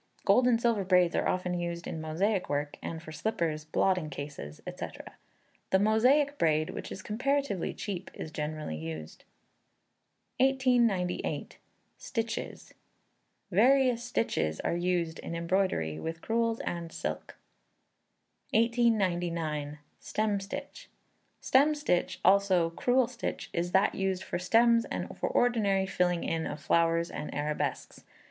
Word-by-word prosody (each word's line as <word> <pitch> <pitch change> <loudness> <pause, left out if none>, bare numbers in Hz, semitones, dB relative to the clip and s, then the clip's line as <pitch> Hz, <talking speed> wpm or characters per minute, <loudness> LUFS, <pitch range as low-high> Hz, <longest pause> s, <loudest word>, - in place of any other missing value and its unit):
Gold 250 0 +5
and 235 -2 +4
silver 230 -4 +1
braids 180 -2 +3
are - - +1
often 180 -1 -1
used 170 0 -4
in 160 - -5
Mosaic 180 +5 0
work, 145 0 -1
and 160 0 -5
for 155 - -9
slippers, 155 -4 -2
blotting 180 +1 +1
cases, 140 - -7
&c. - - -5 0.8
The 190 - +4
Mosaic 255 +8 +3
braid, 155 -1 +2
which - - -7
is 190 - -7
comparatively 265 -2 -1
cheap, 195 -3 -5
is 160 - -6
generally 150 - -4
used. 80 0 -7 1.1
1898. 245 -9 +1 0.4
Stitches. 225 -1 -4 0.8
Various 250 +4 +4
stitches 225 - -1
are - - -1
used 175 -2 -1
in 170 - -5
embroidery 170 - 0
with 165 0 -5
crewels 230 0 0
and 170 -1 -4
silk. - - -5 1.2
1899. 175 -10 +1 0.2
Stem 210 -2 -1
Stitch. 285 - -7 0.5
Stem 290 +4 +4
stitch, 290 -12 0
also 190 -4 +4
Crewel 245 +8 +2
stitch, 240 -1 -5
is 175 +1 -1
that 190 +2 +3
used 190 -1 -1
for - - -3
stems 230 +5 +4
and - - -5
for - - -2
ordinary 210 -6 +2
filling 180 -2 0
in 165 -1 -1
of 150 - -5
flowers 165 +3 +2
and 150 - -5
arabesques. 150 +1 -3
185 Hz, 125 wpm, -30 LUFS, 165-230 Hz, 1.2 s, Gold